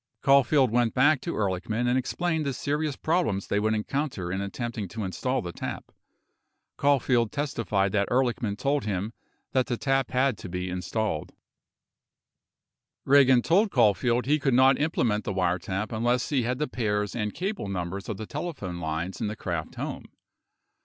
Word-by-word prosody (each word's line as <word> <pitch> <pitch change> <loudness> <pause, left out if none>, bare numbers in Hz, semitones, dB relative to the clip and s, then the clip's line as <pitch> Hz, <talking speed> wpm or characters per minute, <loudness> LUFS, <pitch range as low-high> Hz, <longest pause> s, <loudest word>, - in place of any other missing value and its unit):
Caulfield 135 -2 +4
went 120 -1 +1
back 145 +2 +4
to 170 - -4
Ehrlichman 105 +4 -1
and 125 - +2
explained 160 +5 -1
the 140 -2 -1
serious 145 +2 -1
problems 155 - 0
they 100 - 0
would 110 +1 +1
encounter 110 -5 -2
in 95 +1 -2
attempting 110 +1 -4
to 110 +4 -5
install 115 +8 -2
the 85 - -5
tap. - - -6 0.8
Caulfield 125 -5 +2
testified 115 -9 -1
that 100 0 +1
Ehrlichman 120 -4 0
told 140 +3 0
him 105 +2 -2 0.4
that 130 -1 +1
the 120 - -1
tap 135 -1 +1
had 130 -3 +1
to - - -8
be 90 +1 -3
installed. 90 -2 -2 1.7
18 135 - +2
Ragan 130 -3 +6
told 200 +6 +3
Caulfield 120 - +2
he 150 +3 +2
could 135 -3 +1
not 130 +2 +5
implement 120 -9 +1
the 100 - -3
wiretap 95 +3 -1
unless 120 +2 0
he 140 -4 +2
had 125 +2 -1
the 150 +2 -1
pairs 105 -4 -1
and 105 -3 -1
cable 195 - -3
numbers 95 +1 -4
of 105 - -3
the 110 - -5
telephone 140 - -5
lines 80 +3 -3
in - - 0
the 105 - -4
Kraft 85 -6 -4
home. - - -5
120 Hz, 165 wpm, -27 LUFS, 100-135 Hz, 1.7 s, Ragan